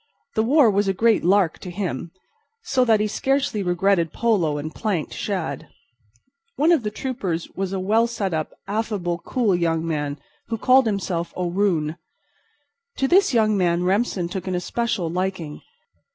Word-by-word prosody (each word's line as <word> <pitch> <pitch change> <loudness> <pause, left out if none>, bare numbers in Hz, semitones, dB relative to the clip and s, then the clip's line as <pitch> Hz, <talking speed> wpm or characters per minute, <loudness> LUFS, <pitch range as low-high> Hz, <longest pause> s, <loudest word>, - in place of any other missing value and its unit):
The 220 - +2
war 255 0 +5
was 200 0 +1
a 195 - +1
great 225 +2 +3
lark 185 -2 +3
to 180 - -8
him, 175 -4 -4 0.5
so 260 -2 +2
that 220 -3 +4
he 210 - +1
scarcely 270 +1 0
regretted 180 -2 +1
polo 185 -11 +1
and 155 +2 -5
planked 195 -9 -2
shad. 175 -9 -3 0.9
One 310 +4 +3
of 330 -6 +4
the 210 - -2
troopers 205 -8 -4
was 190 -1 -3
a 195 - -2
well 220 +5 +2
set 205 -6 -3
up, 155 -1 -2 0.2
affable, 200 -5 -2
cool 230 -8 +1
young 165 -1 0
man, 145 -3 -2 0.3
who 230 - -2
called 255 +2 +4
himself 180 -5 -2
O'Roon. 175 -3 0 1.0
To 270 - +1
this 380 +3 +4
young 220 -3 +3
man 175 -2 +1
Remsen 190 -1 0
took 190 +2 -5
an 185 - -1
especial 205 +1 -1
liking. 180 -3 -3
195 Hz, 160 wpm, -23 LUFS, 170-225 Hz, 1.0 s, war